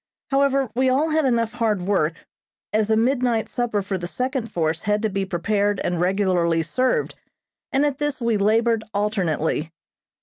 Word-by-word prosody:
However, 275 -2 +2
we 260 +2 +2
all 290 +5 +2
had 310 -1 +2
enough 230 -3 +1
hard 220 -6 0
work, 170 -4 0 0.5
as 215 0 +1
a 220 - +3
midnight 240 -2 +1
supper 220 -2 -1
for 190 -1 -3
the 175 - -4
second 255 +2 -3
force 160 -1 -1
had 210 +1 0
to 220 - +1
be 195 0 -1
prepared 200 +2 0
and 175 -1 -1
regularly 180 -3 +1
served, 255 +10 0 0.6
and 275 +2 +2
at 285 -2 -1
this 295 -2 -1
we 235 -2 +1
labored 225 +2 +2
alternately. 170 -6 -1
215 Hz, 165 wpm, -23 LUFS, 190-250 Hz, 0.6 s, a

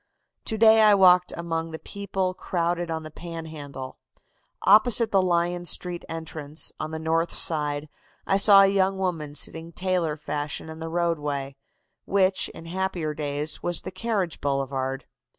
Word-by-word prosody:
"To 220 - -1
day 220 0 +6
I 210 -1 +7
walked 180 -2 +5
among 165 -1 -3
the 160 - -6
people 195 0 -3
crowded 175 -1 -2
on 160 -1 -3
the 155 - -9
Panhandle. 155 -6 -8 0.6
Opposite 220 +2 +5
the 195 - +4
Lyon 175 -1 0
Street 175 0 +1
entrance, 155 -2 -4
on 155 - -3
the 160 - -5
north 165 +1 0
side, 150 -2 +1 0.4
I 195 - +2
saw 200 0 +7
a - - +7
young 195 0 +2
woman 165 -6 -3
sitting 165 +2 -3
tailor 180 -4 -1
fashion 150 +1 -4
in 160 - -10
the 165 0 -5
roadway, 150 -5 -2 0.5
which, 190 -1 +2
in 165 - -12
happier 175 -3 -2
days, 150 0 -2
was 175 -1 -1
the 185 - -6
carriage 195 -3 -2
boulevard. 135 -1 -2
170 Hz, 150 wpm, -25 LUFS, 155-185 Hz, 0.6 s, I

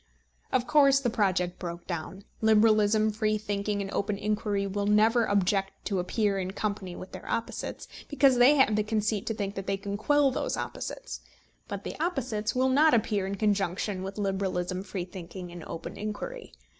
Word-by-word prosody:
Of 250 - +2
course 275 -2 +5
the 245 -4 -1
project 185 -5 0
broke 170 -1 -6
down. 180 +3 -5 0.2
Liberalism, 215 0 +4
free 215 0 0
thinking, 205 -1 -2
and 195 - -6
open 200 0 -1
inquiry 210 -1 -1
will 200 +1 -2
never 220 +3 +4
object 195 0 +1
to 195 -3 0
appear 200 +2 0
in 185 0 -3
company 200 -4 -3
with 185 - -9
their - - -9
opposites, 230 - -3 0.2
because 275 -3 +4
they 260 +5 +7
have 265 -6 +4
the 215 - +2
conceit 215 -1 -1
to 225 - -1
think 200 -2 -3
that 195 -1 -6
they 195 - 0
can 200 0 -4
quell 290 +5 +3
those - - -2
opposites; - - -5 0.5
but - - -5
the - - -6
opposites 255 -11 -1
will 260 +1 +3
not 290 +1 +5
appear 210 -3 0
in 195 - -3
conjunction 195 -1 0
with 195 +2 -6
liberalism, 190 -2 -1
free 190 -2 -5
thinking, 180 0 -8
and 175 -1 -9
open 165 - -7
inquiry. 450 - -6
205 Hz, 180 wpm, -28 LUFS, 195-225 Hz, 0.5 s, they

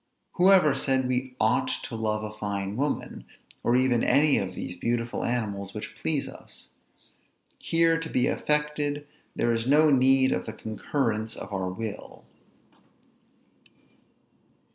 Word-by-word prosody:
Who 185 +2 +4
ever 175 -7 +6
said 130 -1 0
we 130 0 -2
ought 110 +3 +2 0.2
to 115 - -6
love 110 -1 -1
a 105 0 -6
fine 100 -1 -3
woman, 145 +4 -3 0.4
or 120 - +2
even 125 -2 +3
any 150 0 +4
of 95 - -4
these 90 - -6
beautiful 115 +5 -2
animals 100 -5 -3
which 105 - -6
please 150 -4 0
us? - - -12 0.9
Here 165 0 +2
to 165 0 -6
be 125 - +1
affected, 150 -1 -1 0.3
there 120 - +1
is 115 +1 -2
no 150 +2 +5
need 130 0 +4
of - - -2
the - - -5
concurrence 110 0 -2
of - - -8
our 95 -1 -2
will. 110 +3 -7
125 Hz, 140 wpm, -27 LUFS, 110-145 Hz, 0.9 s, ever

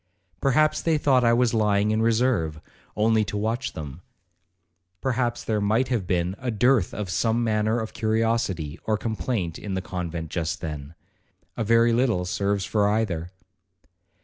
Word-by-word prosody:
Perhaps 155 +3 +3
they 165 -2 +2
thought 135 -4 +3
I 115 - +4
was 120 0 +2
lying 105 -1 +2
in 110 +1 +1
reserve, 110 -9 +1 0.4
only 110 0 +3
to 105 - -4
watch 115 +5 -2
them. 75 +1 -7 1.0
Perhaps 120 -1 -1
there 110 -2 -1
might 110 +5 +1
have 115 -8 -1
been 90 +1 0
a 125 - -3
dearth 120 -2 +2
of 105 -4 -5
some 115 +6 +1
matter 110 +1 +1
of 110 -1 -5
curiosity 110 -8 -1
or 110 -1 +1
complaint 110 -5 -3
in 100 -2 -4
the - - 0
convent 85 -3 -5
just 85 -2 -2
then,—a 75 +7 -9
very 115 +2 +4
little 115 -7 +1
serves 100 +2 -1
for 105 -2 +2
either. 95 -6 -1
110 Hz, 150 wpm, -25 LUFS, 90-115 Hz, 1.0 s, I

